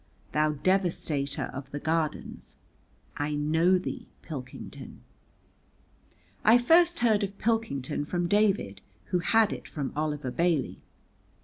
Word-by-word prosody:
Thou 150 0 +2
devastator 160 -4 0
of 135 0 -7
the 145 - -5
Gardens, 160 0 -2 0.6
I 145 +1 -1
know 160 +5 +3
thee, 185 - -6
Pilkington. 130 -6 -8 1.4
I 225 +3 +7
first 335 +7 +4
heard 220 -3 +3
of 200 0 -3
Pilkington 210 - -1
from 175 +2 -1
David, 200 - +1 0.3
who 180 - +2
had 220 +4 +3
it - - -8
from 145 -4 -4
Oliver 150 -3 -2
Bailey. 170 -1 0
165 Hz, 115 wpm, -28 LUFS, 145-205 Hz, 1.4 s, I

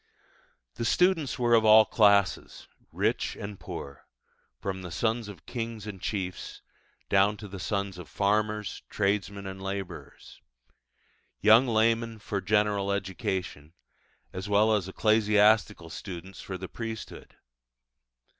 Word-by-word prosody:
The - - -2
students 170 +2 +2
were 120 -1 +2
of 115 -1 +5
all 110 0 +8
classes 100 -3 +2 0.2
rich - - -1
and 100 -1 -7
poor 70 0 -8 0.5
from 95 -1 -4
the 90 - -7
sons 110 +5 -1
of 100 -2 -11
kings 115 -3 -5
and 100 -4 -8
chiefs 95 -4 -4 0.4
down 100 +2 +3
to 105 - -9
the 95 -1 -8
sons 100 0 -3
of 85 - -10
farmers, 105 0 -1
tradesmen, 100 0 -1
and 95 0 -7
labourers; 95 -1 -7 1.0
young 110 +5 +6
laymen 115 0 +1
for 100 -1 -4
general 105 0 +1
education, 95 - -4 0.6
as 95 +2 -6
well 105 +2 +4
as 100 -4 0
ecclesiastical 105 -4 +3
students 95 0 -8
for 95 - -6
the 95 +1 -7
priesthood. 115 +1 -7
105 Hz, 125 wpm, -28 LUFS, 95-110 Hz, 1.0 s, all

